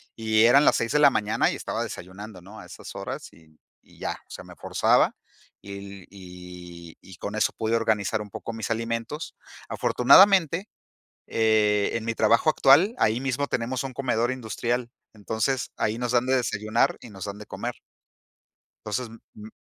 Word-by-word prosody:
Y 110 0 +3
eran 140 +5 +6
las - - +5
6 115 - -1
de 150 - +2
la 145 -2 +7
mañana 105 -2 +1
y - - -4
estaba - - -3
desayunando, 95 +2 -9
¿no? 100 +5 -12
A - - -11
esas 90 - -11
horas, - - -6
y 80 -1 -22 0.2
y - - -22
ya. - - -2
O - - -20
sea, - - -8
me - - -13
forzaba, - - +2 0.5
y 100 -1 -9
y 90 -3 -11
y 95 - -13
con 105 +3 -5
eso 110 - +1
pude 110 +1 0
organizar 110 -2 0
un 105 - -14
poco 115 - -6
mis 115 0 -4
alimentos. 115 +6 -3 0.3
Afortunadamente, 185 - +5 0.6
eh, 105 -2 +2
en 115 -1 -2
mi 115 0 -2
trabajo 115 +7 +3
actual, 160 - +5
ahí 110 +3 +2
mismo 135 +1 -1
tenemos 125 +2 -2
un 130 -1 -6
comedor 120 -3 0
industrial, 120 0 -3 0.2
entonces 110 +4 -2
ahí 110 +1 0
nos 120 0 -2
dan 125 0 +2
de 130 0 +3
desayunar 110 -3 0
y - - -11
nos 100 -3 -9
dan 100 0 -6
de 105 - -10
comer. - - -5 1.1
Entonces, 115 +4 -2 0.3
m-m 105 +1 -10
110 Hz, 175 wpm, -25 LUFS, 105-125 Hz, 1.1 s, la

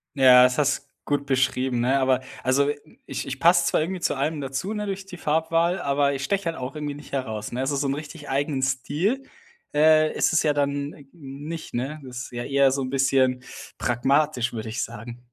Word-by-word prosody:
Ja, 125 -2 +8
das 125 +1 +3
hast 140 -1 0 0.2
gut 145 -1 -1
beschrieben, 130 -2 +1
ne, 130 +3 +2
aber 130 -1 +3 0.2
also, 140 +2 +3 0.4
ich - - -4
ich 135 0 -5
passe 175 +2 +5
zwar - - +2
irgendwie 180 +2 -3
zu - - 0
allem 145 +2 -1
dazu, 135 +10 -3
ne, 210 -1 -3
durch 195 -1 -4
die 190 -2 -9
Farbwahl, 165 +3 +1
aber 140 0 +1
ich 135 0 -4
steche 200 +4 -1
halt 165 - -2
auch 130 +3 -5
irgendwie 150 -1 -4
nicht 145 -1 -13
heraus, 110 -5 -3
ne? 125 - -2
Also 135 +2 0
so 140 0 0
'nen 135 - 0
richtig 150 0 -8
eigenen 140 0 0
Stil, 145 - 0 0.5
äh, 155 +1 +5
ist - - +1
es 165 - +3
ja 150 - +3
dann 140 0 -1
n 140 -2 -16
nicht, 150 +1 -8
ne, 135 +5 -3
das 125 -1 -6
ist - - -10
ja 120 0 -4
eher 140 0 +3
so 135 +1 -1
'n 130 - -3
bisschen 130 -1 +2 0.4
pragmatisch, 125 0 +1
würde 110 -1 -5
ich 110 -1 -2
sagen. 120 +3 -8
140 Hz, 210 wpm, -24 LUFS, 130-155 Hz, 0.5 s, Ja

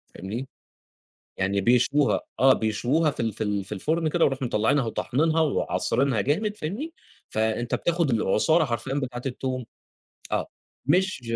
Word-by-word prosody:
فاهمني، 110 +8 -5 0.9
يعني 100 +1 0
بيشووها، 125 +6 +3 0.2
آه، 135 0 +7
بيشووها 125 +9 +1
في - - -12
ال 115 -1 0
في 110 - -3
ال 105 -2 -1
في 95 - -12
الفرن 155 - 0
كده 170 +2 +3
ويروحوا 135 -2 -1
مطلعينها 120 +5 +2
وطاحنينها 155 +8 +1
وعاصرينها 135 -4 +1
جامد 205 - 0
فاهمني، 225 - -4 0.4
فأنت 110 +2 0
بتاخد 170 -4 0
العصارة 120 - +3
حرفيًا 120 +1 -3
بتاعة 130 -3 -3
التوم، 130 -1 -3 0.7
آه، - - 0 0.4
مش 185 0 +2
130 Hz, 135 wpm, -25 LUFS, 110-155 Hz, 0.9 s, آه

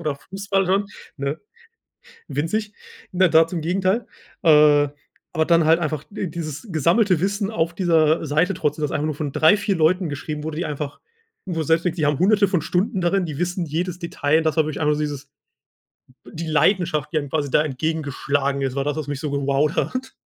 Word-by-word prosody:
oder 155 -4 -2
Fußball 195 +4 -2
schon, 195 +2 +1 0.3
ne 140 +2 -3 0.9
winzig, 210 +8 -2 0.4
ne, 185 0 +4
da 160 0 +5
zum 165 -1 -4
Gegenteil. 185 +7 0 0.4
Äh, 150 -3 +6 0.4
aber 160 -2 +1
dann 170 -1 +4
halt 160 +2 +4
einfach 155 -3 -2
die 200 -3 -4
dieses 155 - -6
gesammelte 170 - +2
Wissen 200 +1 -1
auf 170 -5 -1
dieser 165 -3 +2
Seite 160 +6 +1
trotzdem, 150 -2 -2
das 150 - -1
einfach 150 - -1
nur 155 -1 -2
von 145 -2 -4
3, 160 +7 +5
4 200 -2 -1
Leuten 165 +2 +2
geschrieben 150 +1 -5
wurde, 155 0 -5
die 175 - -2
einfach 150 -1 -5 0.5
wo 180 -3 -4
du - - 0
selbst 165 +2 +2
denkst, 180 -1 -1
die 155 - +1
haben 145 -1 +1
Hunderte 205 +2 +4
von 185 -4 0
Stunden 185 +5 -1
darin, 180 +2 +1
die 150 -4 -6
wissen 180 +1 -2
jedes 175 +3 -3
Detail, 160 -3 0
und 165 - +1
das 155 - +1
war 160 - +4
wirklich 155 -1 -4
einfach 150 -1 +2
nur 150 - -3
dieses 145 -2 -4 1.0
be - - -14
die 165 0 -5
Leidenschaft, 155 -1 +1
die 165 - 0
dann 145 -2 -2
quasi 145 -2 -2
da - - +4
entgegengeschlagen 140 -1 -1
ist, 135 -1 -2
war 140 0 -1
das, 145 - -1
was 155 -3 -4
mich 145 -2 -4
so 150 - -3
gewowt 140 +2 0
hat. 255 +1 -2
160 Hz, 205 wpm, -22 LUFS, 150-180 Hz, 1.0 s, Äh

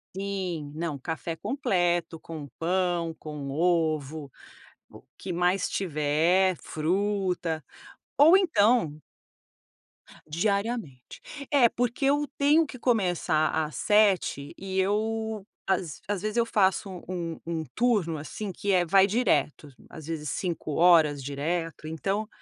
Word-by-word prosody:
Sim, 185 -7 -4
não, 155 -3 -3
café 160 +3 -4
completo, 175 - 0
com 155 -3 -8
pão, 175 -1 0
com 150 -3 -7
ovo, 155 -3 0 0.6
o - - -15 0.2
que 185 - -7
mais 180 +2 +1
tiver, 170 +2 +1
fruta 180 -1 -1 0.6
ou 320 +7 +8
então 220 - +2 1.3
Diariamente. 200 - -2 0.3
É 275 -5 +6
porque 245 +3 -1
eu 290 +2 +3
tenho 300 +3 +4
que 260 -3 -10
começar 180 -10 +1
às 155 -1 -2
07:00 200 -9 +2
e 190 0 -3
eu 215 +1 -1 0.2
às 180 -5 -1
às 205 -2 -2
vezes 215 +2 -3
eu 235 - +3
faço 195 -3 +1 0.2
um 170 -3 -4
um 165 -1 -3
turno 210 -9 +1
assim 190 +7 -6
que 200 +2 -2
é 180 -2 +3
vai 195 +3 +5
direto, 185 - 0 0.2
às 155 - -10
vezes 155 -2 -4
5 170 -1 -3
horas 160 -5 +5
direto, 155 +3 -3
então 195 +7 -2
180 Hz, 120 wpm, -27 LUFS, 160-205 Hz, 1.3 s, ou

